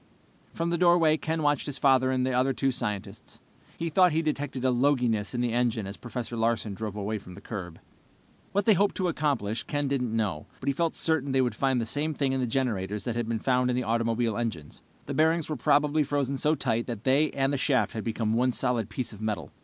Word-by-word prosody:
From 170 0 -2
the 170 - 0
doorway 170 -3 +5
Ken 160 0 -2
watched 145 -1 +1
his 140 -2 -4
father 130 -1 +4
and 130 -1 +1
the 130 - 0
other 130 +2 +2
two 135 +1 +1
scientists. 105 -6 -5 0.4
He 165 0 -3
thought 180 +2 +5
he 160 +1 +1
detected 145 -4 -2
a 130 - +4
loginess 125 -4 +1
in 120 - 0
the 120 -2 0
engine 120 -3 0
as 100 +1 -6
Professor 120 0 -6
Larsen 115 -2 0
drove 105 0 -5
away 105 +1 -3
from 90 -2 -12
the - - -10
curb. 90 -6 -7 0.7
What 200 0 0
they 220 - +6
hoped 200 +2 +2
to 185 -2 0
accomplish, 135 -9 -1
Ken 145 -1 -2
didn't 125 -5 -1
know, 95 -9 -2
but - - -9
he 140 - +2
felt 165 +3 0
certain 145 -4 +1
they 135 - +4
would 125 -2 0
find 135 -2 +1
the 115 - -1
same 145 +6 -1
thing 135 -2 0
in 135 - 0
the 125 - 0
generators 105 -5 -1
that 120 -2 -3
had 120 -1 -2
been 115 - 0
found 125 +2 +1
in 125 - +1
the 125 - 0
automobile 115 -1 0
engines. 90 -11 -5 0.2
The 140 - -4
bearings 160 +2 +2
were 155 - -1
probably 145 +4 +2
frozen 140 -2 -1
so 155 +1 +2
tight 120 -4 -1
that 115 -3 -5
they 140 +4 +3
and 135 +1 +1
the - - +1
shaft 135 -1 +2
had 110 - -4
become 110 -1 -1
one 125 +2 +2
solid 120 -5 0
piece 120 -3 -4
of 105 - -11
metal. 110 -1 -3
130 Hz, 235 wpm, -27 LUFS, 115-145 Hz, 0.7 s, they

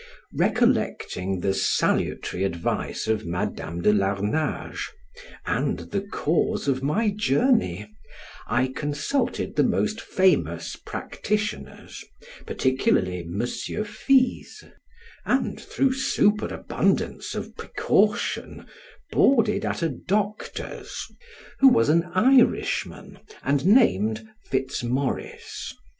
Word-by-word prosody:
Recollecting 95 0 0
the 95 +1 +1
salutary 95 -1 0
advice 85 -4 -2
of 110 -1 0
Madam 85 -1 -4
de 105 - +5
Larnage, 105 +9 -1 0.6
and - - 0
the 200 - 0
cause 170 -7 -1
of 130 -1 +1
my 205 +11 +1
journey, 140 - +1 0.6
I 130 +1 +1
consulted 145 - -2
the - - +4
most 215 +2 0
famous 185 0 +1
practitioners, 210 0 -4 0.4
particularly 95 -9 +1
Monsieur 120 - -3
Fizes; 255 +5 +1 0.6
and - - 0
through 270 -1 0
superabundance 210 -5 0
of - - -6
precaution - - 0 0.5
boarded 230 -6 +3
at - - -2
a 165 - +2
doctor's 205 - -3 0.6
who 270 - +8
was 245 - +5
an 165 +2 +3
Irishman, 255 +6 +2 0.2
and 140 +3 +1
named 110 - +3 0.2
Fitz 130 0 -1
Morris. 130 +3 -3
145 Hz, 90 wpm, -25 LUFS, -, 0.6 s, who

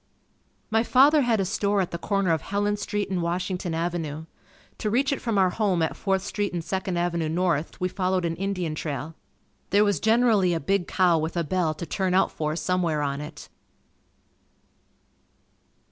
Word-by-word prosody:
My 225 +1 +3
father 275 +6 +5
had 235 -4 +2
a 195 - +1
store 200 +2 0
at 185 - -1
the 170 - -4
corner 195 -2 0
of 160 - -1
Helen 205 +1 -1
St., 205 0 -2
and 180 -2 0
Washington 180 0 -2
Avenue. 165 -2 -3 0.5
To 215 - -1
reach 265 +5 +2
it - - -4
from 230 -3 -1
our 185 -2 +4
home 190 -5 +1
at 160 - -1
Fourth 190 -1 0
Street 205 -1 -2
and 170 -2 -3
Second 190 0 -2
Avenue 170 -2 0
North, 170 -2 -1
we 180 - +1
followed 185 -1 -1
an 165 0 -1
Indian 185 -4 -2
trail. 150 0 -4 0.6
There 205 +1 +4
was 205 -6 +1
generally 220 -5 +3
a - - -1
big 195 +4 0
cow 180 -3 +3
with 160 +3 -3
a 170 - +1
bell 165 -1 0
to 170 - -6
turn 185 +1 -1
out 190 - +3
for 155 0 -2
somewhere 170 -2 0
on 140 0 -2
it. 150 - -9
185 Hz, 180 wpm, -25 LUFS, 165-200 Hz, 0.6 s, father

